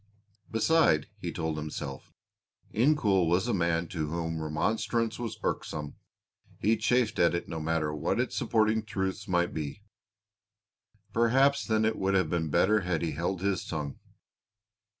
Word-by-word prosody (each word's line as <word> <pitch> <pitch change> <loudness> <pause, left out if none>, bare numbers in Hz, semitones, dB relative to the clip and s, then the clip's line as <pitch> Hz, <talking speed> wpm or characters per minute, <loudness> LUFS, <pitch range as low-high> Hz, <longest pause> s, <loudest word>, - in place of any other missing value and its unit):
Beside, 115 - +3
he - - -4
told 80 -1 -3
himself, 75 -3 -6 0.6
Incoul 110 - +3
was 90 +7 +2
a 120 - +1
man 85 -2 +1
to 80 -3 -2
whom 80 0 -3
remonstrance 110 +9 -1
was 115 -3 -4
irksome, 75 -2 -3 0.6
he 110 +3 +2
chafed 125 -1 +1
at 85 0 +4
it 85 - -3
no 80 -1 -4
matter 80 -1 -1
what 75 +9 -1
its 125 - -1
supporting 110 -1 +2
truths 95 -1 -3
might 90 -2 +1
be. 80 +6 -5 1.3
Perhaps 135 +5 +3
then 110 -1 +2
it 110 0 +1
would 95 0 +1
have 95 -5 +2
been 80 -2 0
better 95 +7 +3
had 90 -3 -1
he 80 - -1
held 85 +5 -2
his 100 -2 0
tongue. 75 -3 -5
90 Hz, 150 wpm, -29 LUFS, 80-110 Hz, 1.3 s, at